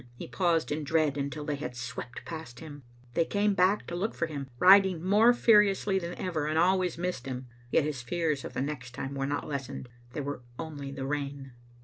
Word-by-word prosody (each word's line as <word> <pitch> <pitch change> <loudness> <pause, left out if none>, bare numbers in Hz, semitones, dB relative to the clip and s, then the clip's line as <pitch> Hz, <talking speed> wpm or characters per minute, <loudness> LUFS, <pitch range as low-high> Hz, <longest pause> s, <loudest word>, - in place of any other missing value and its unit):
He - - -8
paused 170 -5 +1
in 150 +1 -1
dread, 155 -1 +2
until 145 +1 -3
they 145 -2 -2
had 125 -3 -5
swept 120 0 -6
past 160 -7 -7
him. 145 -3 -9 0.3
They 170 - +3
came 205 +4 +1
back 190 +2 +3
to 170 - -5
look 200 +6 -2
for 170 - 0
him, 140 -4 -6
riding 190 0 +6
more 210 +5 +6
furiously 210 -4 +4
than 175 -1 -5
ever, 160 -5 -2
and 155 +1 0
always 180 +1 +2
missed 175 -7 -3
him, 130 0 -5 0.2
yet 145 - +3
his 145 -4 -3
fears 155 +2 -1
of - - -7
the - - -2
next 125 -4 -5
time 135 +2 -4
were 135 0 -2
not 145 +1 -2
lessened. 135 -3 -5 0.2
They 150 - -3
were 145 -2 -4 0.2
only 145 -4 -6
the 135 -1 -5
rain. 140 -1 -4
155 Hz, 210 wpm, -29 LUFS, 140-180 Hz, 0.3 s, riding